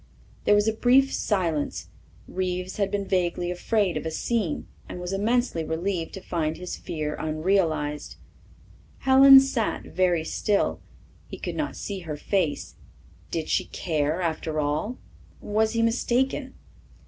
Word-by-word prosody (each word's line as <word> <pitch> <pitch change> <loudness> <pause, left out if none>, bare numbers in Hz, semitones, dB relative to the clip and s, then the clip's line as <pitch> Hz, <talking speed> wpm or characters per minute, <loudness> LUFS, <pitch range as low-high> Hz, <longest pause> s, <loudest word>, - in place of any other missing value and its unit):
There 205 - +5
was 205 +1 +3
a 220 - +2
brief 260 +4 +4
silence. 170 -8 -1 0.4
Reeves 185 0 -3
had 200 -2 +1
been 200 0 -2
vaguely 180 -2 0
afraid 195 +1 0
of - - -4
a 160 - -2
scene 190 0 -1 0.2
and - - -6
was 180 +1 -4
immensely 220 -3 +1
relieved 165 +1 -2
to 190 - -7
find 160 -3 -2
his 180 0 -5
fear 150 -2 -4
unrealized. 155 -2 0 0.9
Helen 270 +1 +9
sat 265 -5 -1
very 180 -3 +1
still. 205 +4 0 0.5
He - - -8
could - - -5
not - - -2
see 200 -2 -5
her 160 -4 -6
face. 165 -2 -1 0.5
Did 160 -2 -3
she - - +1
care, 155 0 -1
after 160 -1 -2
all? 155 - -1 0.4
Was 220 +1 0
he 230 0 +1
mistaken? 255 +3 0
185 Hz, 140 wpm, -26 LUFS, 160-220 Hz, 0.9 s, Helen